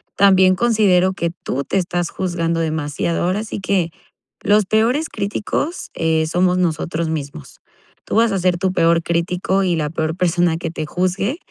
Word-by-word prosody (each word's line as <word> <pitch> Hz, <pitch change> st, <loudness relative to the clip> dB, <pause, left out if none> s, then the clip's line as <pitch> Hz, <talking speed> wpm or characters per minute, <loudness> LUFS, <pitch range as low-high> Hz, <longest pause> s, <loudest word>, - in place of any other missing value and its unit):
también 190 Hz, -2 st, +5 dB
considero 195 Hz, -4 st, +3 dB
que 170 Hz, -2 st, -2 dB
tú 140 Hz, -5 st, -4 dB
te 195 Hz, -, -2 dB
estás 175 Hz, -2 st, -1 dB
juzgando 170 Hz, -2 st, -2 dB
demasiado, 160 Hz, 0 st, -1 dB
ahora 185 Hz, +5 st, 0 dB
sí 220 Hz, -, -6 dB
que 185 Hz, -3 st, 0 dB, 0.5 s
los 210 Hz, 0 st, +3 dB
peores 230 Hz, +10 st, +2 dB
críticos, 215 Hz, -, -3 dB
eh, 160 Hz, -1 st, +1 dB
somos 180 Hz, +3 st, +1 dB
nosotros 165 Hz, -1 st, -1 dB
mismos. 145 Hz, -, -6 dB, 0.4 s
Tú -, -, -4 dB
vas 225 Hz, 0 st, +4 dB
a 195 Hz, -, 0 dB
ser 180 Hz, -1 st, +1 dB
tu 185 Hz, +1 st, 0 dB
peor 170 Hz, -1 st, +3 dB
crítico 180 Hz, +3 st, 0 dB
y 180 Hz, -2 st, +1 dB
la 150 Hz, -2 st, -2 dB
peor 160 Hz, 0 st, -2 dB
persona 175 Hz, -2 st, +1 dB
que 165 Hz, -, -4 dB
te 155 Hz, -2 st, -5 dB
juzgue, 185 Hz, -, -1 dB
180 Hz, 165 wpm, -19 LUFS, 165-195 Hz, 0.5 s, también